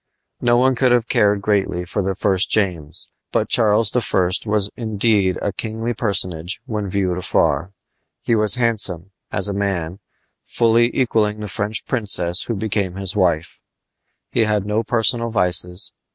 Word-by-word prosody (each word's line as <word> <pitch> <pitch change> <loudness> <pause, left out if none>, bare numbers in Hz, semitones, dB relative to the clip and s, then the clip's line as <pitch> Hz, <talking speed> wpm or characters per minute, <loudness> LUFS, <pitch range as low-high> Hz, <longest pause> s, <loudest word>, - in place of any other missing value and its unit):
No 120 0 +3
one 130 +2 +3
could 125 0 +2
have 120 -1 +2
cared 105 -4 +2
greatly 95 -4 0
for 100 +4 -3
the 95 0 -2
first 95 0 +1
James, 85 -8 -2 0.2
but - - -1
Charles 110 -1 +3
I. 95 -6 +1 0.2
was 105 -1 +1
indeed 105 -4 +1
a 100 - -1
kingly 115 +2 -4
personage 90 -6 -1
when 105 -5 -4
viewed 90 -2 -1
afar. 90 0 0 0.5
He - - 0
was 110 +1 +4
handsome, 100 -7 +1 0.2
as - - +4
a 100 - -3
man, 95 -3 -3 0.4
fully 115 0 +2
equaling 110 -4 +1
the 105 - -5
French 105 +1 -3
princess 90 -7 +1
who 115 - -3
became 100 -3 -2
his 95 -1 -3
wife. 85 -5 0 0.7
He 115 - +2
had 105 -2 0
no 105 +2 0
personal 115 +1 0
vices. 90 -3 +1
105 Hz, 150 wpm, -19 LUFS, 95-115 Hz, 0.7 s, was